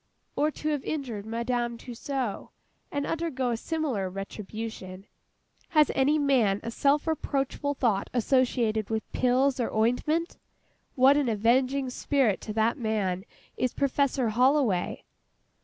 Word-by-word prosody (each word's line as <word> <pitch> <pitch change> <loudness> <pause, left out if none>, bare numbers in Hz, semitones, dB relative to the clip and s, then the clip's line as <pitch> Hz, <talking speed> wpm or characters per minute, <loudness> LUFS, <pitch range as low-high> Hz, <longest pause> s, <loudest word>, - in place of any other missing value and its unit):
Or 300 - +2
to 305 0 -4
have 295 -3 -1
injured 240 -9 -4
MADAME 235 +1 -1
TUSSAUD, 250 -1 -4 0.4
and 285 -1 -2
undergo 290 -7 -1
a - - 0
similar 265 - -2
retribution. 195 0 -7 0.6
Has 305 -5 +4
any 280 +3 +3
man 250 -9 +2
a 230 - -4
self 285 +4 +2
reproachful 285 -2 -1
thought 220 -7 0
associated 240 -3 +1
with 220 -1 -1
pills, 255 +2 +2
or 240 - -1
ointment? 300 - 0 0.6
What 270 +1 +6
an 280 -4 +1
avenging 255 +5 +2
spirit 255 -6 +1
to 215 - -5
that 225 +5 +1
man 205 -5 -1 0.3
is 255 - -1
PROFESSOR 275 -3 +1
HOLLOWAY! 250 -4 +2
250 Hz, 125 wpm, -27 LUFS, 220-280 Hz, 0.6 s, What